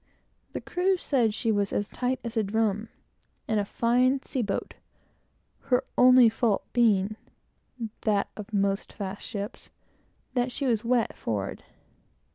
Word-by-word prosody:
The -, -, -4 dB
crew 370 Hz, +1 st, +1 dB
said 250 Hz, -10 st, +2 dB
she 225 Hz, +2 st, -1 dB
was 205 Hz, -2 st, 0 dB
as 205 Hz, -, -1 dB
tight 250 Hz, +2 st, -2 dB
as 235 Hz, -1 st, -5 dB
a 225 Hz, -, +3 dB
drum, 215 Hz, +1 st, 0 dB, 0.6 s
and 220 Hz, -1 st, +1 dB
a -, -, +1 dB
fine 250 Hz, +5 st, +2 dB
sea 260 Hz, -, -2 dB
boat, 205 Hz, -3 st, -3 dB, 0.9 s
her 255 Hz, -2 st, +2 dB
only 250 Hz, -1 st, +7 dB
fault 225 Hz, -2 st, +1 dB
being, 215 Hz, -3 st, +3 dB, 0.8 s
that 205 Hz, -2 st, +1 dB
of 210 Hz, +1 st, -8 dB
most 200 Hz, -1 st, 0 dB
fast 200 Hz, -1 st, -5 dB
ships, 205 Hz, -2 st, -6 dB, 0.6 s
that 250 Hz, 0 st, 0 dB
she 275 Hz, -, -3 dB
was 230 Hz, -3 st, +1 dB
wet, 235 Hz, -1 st, +1 dB
forward. 100 Hz, -3 st, -3 dB
225 Hz, 140 wpm, -27 LUFS, 205-250 Hz, 0.9 s, only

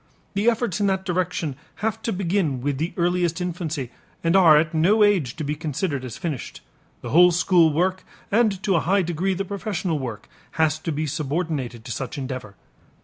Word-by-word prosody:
The 205 Hz, +4 st, +3 dB
efforts 230 Hz, -4 st, -1 dB
in 200 Hz, -, +3 dB
that 190 Hz, -1 st, 0 dB
direction 180 Hz, -5 st, -1 dB, 0.2 s
have 220 Hz, +1 st, -2 dB
to 230 Hz, -, -2 dB
begin 180 Hz, -, 0 dB
with 140 Hz, +1 st, -2 dB
the 165 Hz, +3 st, -1 dB
earliest 175 Hz, -1 st, +1 dB
infancy 165 Hz, -, -3 dB, 0.3 s
and 165 Hz, +2 st, +2 dB
are 165 Hz, -5 st, +7 dB
at 155 Hz, +2 st, +1 dB
no 195 Hz, +7 st, +4 dB
age 185 Hz, -12 st, +2 dB
to 155 Hz, -, -4 dB
be 145 Hz, +1 st, -1 dB
considered 150 Hz, -2 st, -3 dB
as 125 Hz, -3 st, -6 dB
finished; 160 Hz, -9 st, -5 dB, 0.4 s
the -, -, -6 dB
whole 180 Hz, +3 st, +7 dB
school 175 Hz, -2 st, +4 dB
work 185 Hz, +4 st, 0 dB, 0.3 s
and 210 Hz, -3 st, +2 dB
to 195 Hz, -3 st, +2 dB
a -, -, +4 dB
high 190 Hz, +5 st, +2 dB
degree 175 Hz, +3 st, -1 dB
the 195 Hz, +2 st, -2 dB
professional 190 Hz, -5 st, -2 dB
work 115 Hz, -6 st, -6 dB, 0.3 s
has 155 Hz, -1 st, +1 dB
to 165 Hz, -, -3 dB
be 155 Hz, +1 st, -2 dB
subordinated 145 Hz, -5 st, -3 dB
to 120 Hz, -, -6 dB
such 130 Hz, +2 st, -4 dB
endeavor. 130 Hz, -7 st, -5 dB
170 Hz, 190 wpm, -23 LUFS, 150-190 Hz, 0.4 s, are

